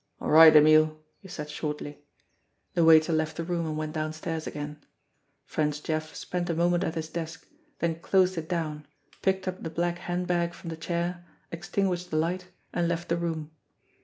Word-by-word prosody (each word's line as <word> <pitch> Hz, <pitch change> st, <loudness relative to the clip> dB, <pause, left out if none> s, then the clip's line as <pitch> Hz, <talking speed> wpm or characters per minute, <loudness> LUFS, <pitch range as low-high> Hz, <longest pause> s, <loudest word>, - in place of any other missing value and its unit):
"All -, -, -3 dB
right, 160 Hz, 0 st, +9 dB
Emile," 155 Hz, +1 st, +6 dB, 0.2 s
he 195 Hz, -, -13 dB
said 150 Hz, -4 st, -6 dB
shortly. 150 Hz, -1 st, -5 dB, 0.7 s
The 170 Hz, -, +3 dB
waiter 160 Hz, 0 st, +6 dB
left 155 Hz, 0 st, -1 dB
the 165 Hz, -, -2 dB
room 170 Hz, -1 st, -2 dB
and 155 Hz, -1 st, -3 dB
went 155 Hz, 0 st, -3 dB
downstairs 155 Hz, +1 st, -3 dB
again. 150 Hz, 0 st, -6 dB, 0.6 s
French 150 Hz, -1 st, -1 dB
Jeff 155 Hz, 0 st, -3 dB
spent 180 Hz, 0 st, -3 dB
a 170 Hz, -, 0 dB
moment 175 Hz, +2 st, +2 dB
at 165 Hz, -, -2 dB
his 160 Hz, -1 st, -3 dB
desk, 165 Hz, +1 st, -6 dB, 0.3 s
then 165 Hz, -1 st, -1 dB
closed 185 Hz, +1 st, +3 dB
it 160 Hz, -1 st, -5 dB
down, 155 Hz, -4 st, -3 dB, 0.3 s
picked 190 Hz, 0 st, 0 dB
up 185 Hz, 0 st, -3 dB
the 160 Hz, -, -4 dB
black 175 Hz, +2 st, -1 dB
handbag 175 Hz, -1 st, -1 dB
from 170 Hz, -, -8 dB
the -, -, -4 dB
chair, 170 Hz, +2 st, -3 dB, 0.3 s
extin 175 Hz, +4 st, -2 dB
guished 180 Hz, -2 st, -1 dB
the 155 Hz, -, -1 dB
light, 180 Hz, +3 st, -1 dB, 0.3 s
and 175 Hz, -1 st, +1 dB
left 170 Hz, 0 st, -2 dB
the 170 Hz, -, +2 dB
room. 160 Hz, -2 st, -3 dB
165 Hz, 185 wpm, -28 LUFS, 155-175 Hz, 0.7 s, right